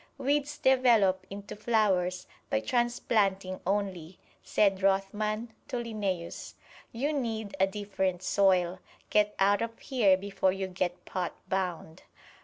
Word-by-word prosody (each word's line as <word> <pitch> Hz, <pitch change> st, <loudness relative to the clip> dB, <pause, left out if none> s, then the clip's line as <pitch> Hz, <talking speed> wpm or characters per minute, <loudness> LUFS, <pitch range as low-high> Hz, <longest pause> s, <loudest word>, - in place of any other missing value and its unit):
"Weeds 285 Hz, +2 st, 0 dB
develop 230 Hz, -9 st, +3 dB
into 200 Hz, 0 st, -8 dB
flowers 195 Hz, -5 st, +1 dB, 0.2 s
by 110 Hz, -, +2 dB
transplanting 200 Hz, -, 0 dB
only," 190 Hz, -4 st, -2 dB, 0.2 s
said 195 Hz, -2 st, +2 dB
Rothman 210 Hz, +4 st, 0 dB
to 270 Hz, -, -4 dB
Linnæus. 205 Hz, -7 st, -4 dB, 0.4 s
"You 280 Hz, +6 st, -1 dB
need 220 Hz, -7 st, -3 dB
a 190 Hz, -, +5 dB
different 190 Hz, -2 st, -2 dB
soil 185 Hz, -2 st, +2 dB, 0.3 s
get 210 Hz, 0 st, +3 dB
out 200 Hz, +2 st, +3 dB
of 230 Hz, 0 st, -3 dB
here 215 Hz, -8 st, +3 dB
before 190 Hz, -1 st, 0 dB
you 190 Hz, 0 st, -3 dB
get 180 Hz, -1 st, -3 dB
pot 180 Hz, -2 st, -3 dB
bound." 180 Hz, -4 st, -3 dB
195 Hz, 120 wpm, -29 LUFS, 185-225 Hz, 0.4 s, a